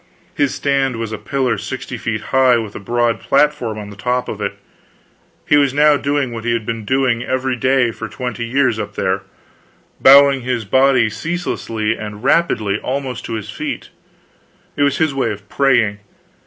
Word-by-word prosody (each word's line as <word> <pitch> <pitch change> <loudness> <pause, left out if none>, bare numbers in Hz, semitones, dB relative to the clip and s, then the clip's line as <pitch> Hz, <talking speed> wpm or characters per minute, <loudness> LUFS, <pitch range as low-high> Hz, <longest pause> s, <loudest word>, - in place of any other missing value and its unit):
His 145 -2 +1
stand 135 -2 0
was 115 -1 -4
a 110 - -5
pillar 130 -4 -1
sixty 130 -1 -6
feet 110 -2 -3
high, 130 -2 +5
with 110 -3 -4
a - - -5
broad 120 +2 0
platform 140 -6 +1
on 105 -1 -7
the - - -11
top 125 +5 -1
of 105 - -6
it. 100 0 -3 0.9
He 145 - +4
was 140 -2 +2
now 150 0 +5
doing 140 -2 -1
what 115 -1 -6
he 120 0 0
had 115 -2 -2
been 115 -1 -4
doing 130 -1 +1
every 130 +1 -1
day 130 0 +2
for 110 0 -7
twenty 125 -2 -5
years 120 -1 +1
up 105 -1 -5
there 95 +1 0 0.8
bowing 140 0 +7
his 125 -3 -2
body 130 +1 +3
ceaselessly 115 -8 -2
and 105 0 -8
rapidly 110 -9 +1
almost 130 -2 -4
to - - -5
his 110 -3 -5
feet. - - -5 0.8
It - - -3
was 140 -1 +2
his 160 -3 +1
way 135 -4 0
of 100 -1 -9
praying. 125 -7 +2
125 Hz, 180 wpm, -18 LUFS, 110-135 Hz, 0.9 s, bowing